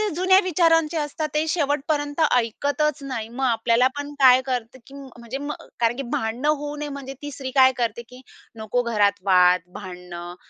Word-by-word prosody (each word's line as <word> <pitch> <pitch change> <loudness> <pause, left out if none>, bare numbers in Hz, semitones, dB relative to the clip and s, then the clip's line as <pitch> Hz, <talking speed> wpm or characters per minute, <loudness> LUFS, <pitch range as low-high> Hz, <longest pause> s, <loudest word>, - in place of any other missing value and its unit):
जुन्या 370 +2 +4
विचारांचे 330 -2 +2
असतात, 305 +1 -3
ते 305 +1 +1
शेवटपर्यंत 290 -1 -1
ऐकतच 285 +5 0
नाही, 235 -5 -5
मग 260 +3 -3
आपल्याला 235 +1 +2
पण 290 0 -5
काय 260 -1 +7
करतं, 250 -1 -4
की 275 - -15
म्हणजे 260 -2 -8
म 290 +1 -4 0.3
कारण 235 0 +2
की 275 - -3
भांडणं 225 +6 -2
होऊ 295 -1 -1
नये 295 0 -5
म्हणजे 275 -1 -7
ती 290 0 -6
स्त्री 265 -1 -6
काय 260 -1 +6
करते, 235 -1 -2
की 250 +1 -13 0.4
नको 220 +3 -1
घरात 210 -4 +2
वाद, 180 -1 +5
भांडणं, 180 -2 -9
265 Hz, 170 wpm, -23 LUFS, 230-290 Hz, 0.4 s, काय